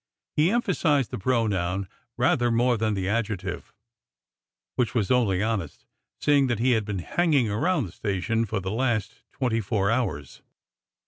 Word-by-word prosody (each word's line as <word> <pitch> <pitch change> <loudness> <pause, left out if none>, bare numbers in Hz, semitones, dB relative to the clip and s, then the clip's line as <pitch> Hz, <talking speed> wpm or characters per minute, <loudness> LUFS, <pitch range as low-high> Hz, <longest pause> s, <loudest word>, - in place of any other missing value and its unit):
He 155 +3 +4
emphasized, 180 - +1
the - - -4
pro 115 +2 +1
noun 95 -1 -1 0.3
rather 120 -1 +2
more 120 +1 +3
than 110 -1 0
the 95 -1 -2
adjective, 100 -4 -2 1.0
which 125 -3 0
was 110 -3 +1
only 105 -7 +2
honest, 105 -8 -3 0.3
seeing 145 -2 +3
that 120 -3 0
he 125 +4 +2
had 110 -3 +2
been 100 -2 -3
hanging 145 -10 +2
around 150 - +1
the 90 - -9
sta 100 0 -3
tion 115 +3 0
for 105 0 -2
the 95 0 -4
last 115 -2 -1
twenty 120 -4 -1
four 100 -1 0
hours. 95 - -2
115 Hz, 165 wpm, -26 LUFS, 100-125 Hz, 1.0 s, He